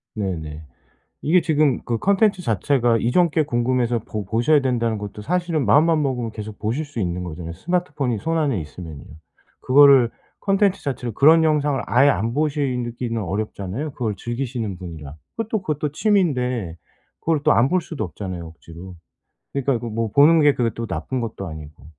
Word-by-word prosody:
네네. 80 Hz, -7 st, -4 dB, 0.6 s
이게 175 Hz, +5 st, +4 dB
지금 155 Hz, -5 st, +2 dB
그 115 Hz, -1 st, -1 dB
콘텐츠 200 Hz, -, +2 dB
자체가 120 Hz, -, +1 dB
이전 165 Hz, +10 st, +2 dB
게 155 Hz, 0 st, +1 dB
궁금해서 120 Hz, -2 st, 0 dB
보 105 Hz, -1 st, -6 dB
보셔야 120 Hz, -, +2 dB
된다는 120 Hz, -4 st, 0 dB
것도 105 Hz, 0 st, -7 dB
사실은 170 Hz, 0 st, -1 dB
마음만 155 Hz, +7 st, +4 dB
먹으면 125 Hz, -5 st, -2 dB
계속 105 Hz, -1 st, -8 dB
보실 120 Hz, +9 st, -2 dB
수 145 Hz, -6 st, -6 dB
있는 90 Hz, -1 st, -2 dB
거잖아요. 85 Hz, -1 st, -6 dB
스마트폰이 145 Hz, -, -2 dB
손안에 150 Hz, -, 0 dB
있으면요. 80 Hz, -1 st, -9 dB, 0.6 s
그거를 135 Hz, -3 st, +6 dB, 0.3 s
콘텐츠 195 Hz, -1 st, +1 dB
자체를 125 Hz, -4 st, -3 dB
그런 160 Hz, +6 st, +6 dB
영상을 150 Hz, -3 st, +1 dB
아예 135 Hz, +4 st, +4 dB
안 115 Hz, -1 st, -1 dB
보시느 140 Hz, -5 st, -1 dB
기는 115 Hz, -2 st, -3 dB
어렵잖아요 105 Hz, -, -4 dB
그걸 115 Hz, -5 st, -2 dB
즐기시는 120 Hz, -3 st, -4 dB
분이라. 80 Hz, -5 st, -9 dB, 0.2 s
그것도, 225 Hz, -2 st, -2 dB
그것도 150 Hz, -4 st, -2 dB
취미인데 125 Hz, -, 0 dB, 0.4 s
그걸 160 Hz, -2 st, 0 dB
또 -, -, +4 dB
안 120 Hz, +4 st, +4 dB
볼 185 Hz, -, +2 dB
수도 155 Hz, -8 st, -5 dB
없잖아요 90 Hz, -1 st, -6 dB
억지로. 85 Hz, +3 st, -12 dB, 0.6 s
그러니까 140 Hz, -1 st, 0 dB
이거 120 Hz, 0 st, -4 dB
뭐 115 Hz, 0 st, -2 dB
보는 155 Hz, +5 st, +6 dB
게 145 Hz, -1 st, +5 dB
그게 115 Hz, -2 st, 0 dB
또 115 Hz, 0 st, -4 dB
나쁜 95 Hz, +9 st, -3 dB
것도 105 Hz, -4 st, -5 dB
아니고. 75 Hz, -3 st, -10 dB
125 Hz, 385 characters per minute, -22 LUFS, 105-150 Hz, 0.6 s, 그거를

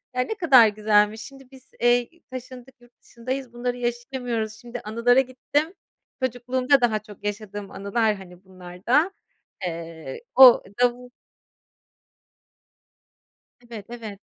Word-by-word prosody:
Ya, 250 Hz, -, +2 dB
ne 440 Hz, -, -3 dB
kadar 270 Hz, -, +6 dB
güzelmiş. 210 Hz, 0 st, +2 dB
Şimdi 270 Hz, -1 st, -12 dB
biz, 265 Hz, -1 st, -17 dB
eee, 240 Hz, 0 st, +3 dB, 0.2 s
taşındık 255 Hz, 0 st, -9 dB
yurt 240 Hz, -, -21 dB
dışındayız, 255 Hz, +1 st, -6 dB
bunları 245 Hz, +1 st, -3 dB
yaşayamıyoruz. 240 Hz, -2 st, -3 dB
Şimdi 240 Hz, +1 st, -9 dB
anılara 235 Hz, +4 st, +3 dB
gittim. 275 Hz, +6 st, -1 dB, 0.5 s
Çocukluğumda 255 Hz, +2 st, +1 dB
daha 220 Hz, -3 st, +2 dB
çok 210 Hz, -2 st, -15 dB
yaşadığım 205 Hz, -1 st, -5 dB
anılar, 215 Hz, +2 st, 0 dB
hani, 180 Hz, -1 st, -14 dB
bunlar 180 Hz, -1 st, -13 dB
da. 295 Hz, +10 st, +3 dB, 0.5 s
Eee, 165 Hz, -, -7 dB
o 255 Hz, -2 st, +9 dB, 0.2 s
davul 245 Hz, 0 st, +1 dB, 2.5 s
Evet, 230 Hz, -4 st, -10 dB
evet. 220 Hz, -4 st, -8 dB
240 Hz, 115 wpm, -24 LUFS, 210-255 Hz, 2.5 s, o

